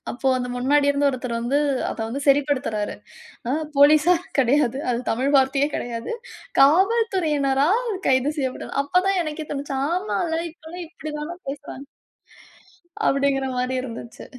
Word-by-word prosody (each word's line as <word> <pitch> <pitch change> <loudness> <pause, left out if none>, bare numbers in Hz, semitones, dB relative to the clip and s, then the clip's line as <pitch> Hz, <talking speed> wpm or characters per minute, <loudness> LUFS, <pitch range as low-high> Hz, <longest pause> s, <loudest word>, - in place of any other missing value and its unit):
அப்போ 255 +3 -5
அந்த 250 0 -3
முன்னாடி 285 +3 +2
இருந்த 285 0 +1
ஒருத்தர் 250 -2 -4
வந்து 255 +5 +1 0.3
அத - - -6
வந்து 275 +4 -4
சரிப்படுத்துறாரு. 275 -7 +1 0.6
அ - - +1 0.3
"போலீஸா 305 +5 +6 0.2
கடையாது. 265 0 +2
அது 235 - -1
தமிழ் 260 +5 0
வார்த்தையே 270 +2 +2
கடையாது. 235 - -5 0.5
காவல் 390 +11 +4
துறையினரால் 305 - +1 0.2
கைது 260 +3 +3
செய்யப்பட்டார்." 260 -2 -4
அப்ப 360 +6 +2
தான் 390 -2 +2
எனக்கே 310 0 -5
தோணுச்சு. 280 -1 -4
ஆமால்ல 345 -2 -1
இப்ப 335 - -30
எல்லாம் 350 0 -7
இப்டித்தானே 310 0 -6
பேசுறாங்க. 280 -1 -7 1.2
அப்டிங்கிற 275 -1 +1
மாதிரி 250 +1 -1
இருந்துச்சு. 230 -1 -8
280 Hz, 135 wpm, -23 LUFS, 260-315 Hz, 1.2 s, போலீஸா